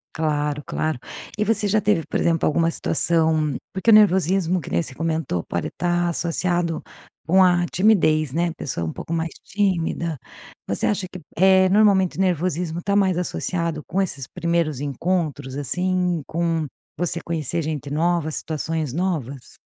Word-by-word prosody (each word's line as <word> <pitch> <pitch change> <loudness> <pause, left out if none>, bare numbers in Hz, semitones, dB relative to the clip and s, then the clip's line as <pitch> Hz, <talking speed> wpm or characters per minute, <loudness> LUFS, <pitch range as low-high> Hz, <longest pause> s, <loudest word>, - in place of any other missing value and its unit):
Claro, 150 -2 -1
claro. 155 -5 -2 0.4
E 210 - +1
você 210 -1 +1
já 215 +2 +3
teve 210 -5 +1
por - - -2
exemplo 165 -1 +2
alguma 165 +2 +2
situação 160 -2 +1 0.2
porque 190 +4 +2
o - - +8
nervosismo 190 -3 +4
que 155 - -8
nem 85 - +1
você 130 - -8
comentou 160 - -1
pode 85 - -2
estar 175 0 0
associado 170 0 -1 0.4
com 185 +4 +4
a 175 -1 +4
timidez 155 -8 +3
né, 170 +3 +1
a - - -6
pessoa 100 - -4
um 80 - -3
pouco 165 - -6
mais 165 0 -1 0.2
tímida? 170 -5 -1 0.5
Você 100 - -1
acha 200 -2 0
que, 180 0 -10 0.2
eh, 190 +1 +5
normalmente 195 -3 +3
nervosismo 175 -2 0
está 200 +3 -1
mais 190 -3 +3
associado 170 -3 -2
com 195 - 0
esses 140 -9 -3
primeiros 165 -4 -1
encontros 145 -2 -2
assim, 180 +4 0
com 165 -1 -1 0.3
você 175 -1 -2
conhecer 165 0 -2
gente 150 -2 -4
novas, 160 +1 0
situações 155 -1 -3
novas? 145 -6 -3
170 Hz, 155 wpm, -22 LUFS, 155-185 Hz, 0.5 s, o